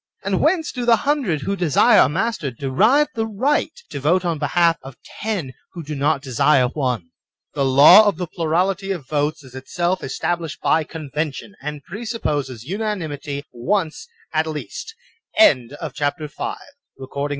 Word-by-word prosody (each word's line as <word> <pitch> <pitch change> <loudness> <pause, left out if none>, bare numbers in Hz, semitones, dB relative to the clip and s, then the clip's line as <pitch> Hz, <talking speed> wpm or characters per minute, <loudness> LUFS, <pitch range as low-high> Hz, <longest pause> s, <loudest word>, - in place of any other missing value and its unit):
And 195 -1 0
whence 320 0 +2
do 250 - -4
the 235 -1 +5
hundred 265 - +1
who 200 +7 -2
desire 175 -7 +4
a - - +5
master 165 -2 -1
derive 200 - +2
the 225 -1 -2
right 255 +8 0 0.2
to - - -4
vote 170 +6 +2
on 165 -3 -1
behalf 165 +3 +2
of 135 -2 -11 0.2
ten 195 -12 -2 0.2
who 170 - -7
do 150 +1 -6
not 140 0 0
desire 135 0 +3
one? 125 - -2 0.4
The 140 - 0
law 140 +11 +8
of 200 - +1
the 180 - -2
plurality 180 +4 -1
of 155 -8 -8
votes 150 +1 -1
is 130 -2 -15
itself 175 +8 -2
established 170 -3 -3
by 160 -1 +2
convention, 155 +3 -5
and 150 0 -6
presupposes 155 - -4
unanimity 160 - -4
once 170 - -2 0.3
at 160 +1 +1
least 150 - -6 0.4
(xa) 130 - +6 0.3
CHAPTER 150 +2 -2
VL 385 - -5 0.4
The 135 - -8
Social 140 +2 -3
Pact. - - -10
160 Hz, 160 wpm, -21 LUFS, 140-200 Hz, 0.4 s, law